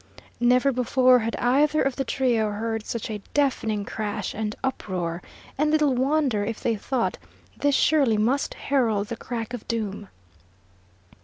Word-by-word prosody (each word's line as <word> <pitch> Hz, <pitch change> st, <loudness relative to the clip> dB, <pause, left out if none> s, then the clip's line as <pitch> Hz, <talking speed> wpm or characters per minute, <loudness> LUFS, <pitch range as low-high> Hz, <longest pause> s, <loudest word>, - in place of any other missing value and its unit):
Never 250 Hz, +3 st, +4 dB
before 255 Hz, 0 st, +4 dB
had 230 Hz, 0 st, -2 dB
either 290 Hz, +5 st, +2 dB
of 270 Hz, -1 st, 0 dB
the 270 Hz, -, -1 dB
trio 240 Hz, -5 st, +1 dB
heard 220 Hz, +1 st, -3 dB
such 230 Hz, -1 st, -4 dB
a 210 Hz, -1 st, -5 dB
deafening 225 Hz, -8 st, +1 dB
crash 210 Hz, -2 st, -4 dB
and 215 Hz, 0 st, -3 dB
uproar, 180 Hz, -9 st, -3 dB, 0.4 s
and 300 Hz, +1 st, +3 dB
little 300 Hz, -3 st, +3 dB
wonder 260 Hz, -4 st, +1 dB
if 220 Hz, +1 st, -4 dB
they 230 Hz, -, 0 dB
thought 245 Hz, +3 st, -2 dB, 0.4 s
this 285 Hz, -1 st, +1 dB
surely 275 Hz, -9 st, +3 dB
must 245 Hz, +7 st, 0 dB
herald 225 Hz, -7 st, 0 dB
the 230 Hz, -, -3 dB
crack 230 Hz, 0 st, -5 dB
of 245 Hz, -, -7 dB
doom! 210 Hz, -3 st, -3 dB
240 Hz, 150 wpm, -25 LUFS, 215-270 Hz, 0.4 s, Never